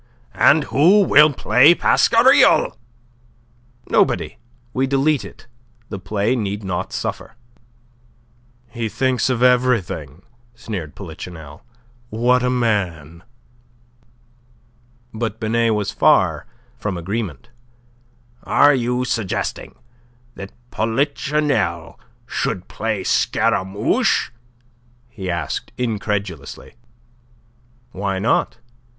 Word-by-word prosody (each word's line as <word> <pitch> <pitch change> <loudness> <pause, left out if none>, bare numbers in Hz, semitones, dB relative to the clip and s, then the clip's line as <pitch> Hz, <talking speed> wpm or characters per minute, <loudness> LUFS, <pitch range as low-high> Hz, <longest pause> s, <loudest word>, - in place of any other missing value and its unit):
"And - - +4
who 185 +9 +4
will 150 -4 +6
play 140 +4 +4
Pasquariel?" - - +4 1.1
"Nobody. - - 0 0.3
We 130 +1 0
delete 140 +2 +1
it. - - -13 0.4
The 100 - -6
play 105 +5 -1
need 105 -3 -3
not 90 -2 -4
suffer." 115 - -5 1.4
"He 115 -2 -4
thinks 130 +2 0
of 125 -1 0
everything," 115 - +1 0.3
sneered 95 -10 -7
Polichinelle. 80 -4 -10 0.5
"What 120 +3 +2
a 125 - 0
man!" 90 - -2 1.9
But 110 -1 -4
Binet 115 0 +1
was 105 -1 -2
far - - +2 0.3
from 100 -4 -3
agreement. 85 - -5 0.9
"Are 145 0 +4
you 125 0 -1
suggesting 110 -6 -3 0.6
that 100 -3 -9 0.2
Polichinelle 120 - -1 0.3
should 90 - -3
play 110 -3 -3
Scaramouche?" 95 +2 0 0.8
he 100 -7 -7
asked, 85 -1 -4
incredulously. 105 - -4 1.2
"Why 95 -1 -3
not? 110 +3 0
110 Hz, 85 wpm, -20 LUFS, 95-125 Hz, 1.9 s, will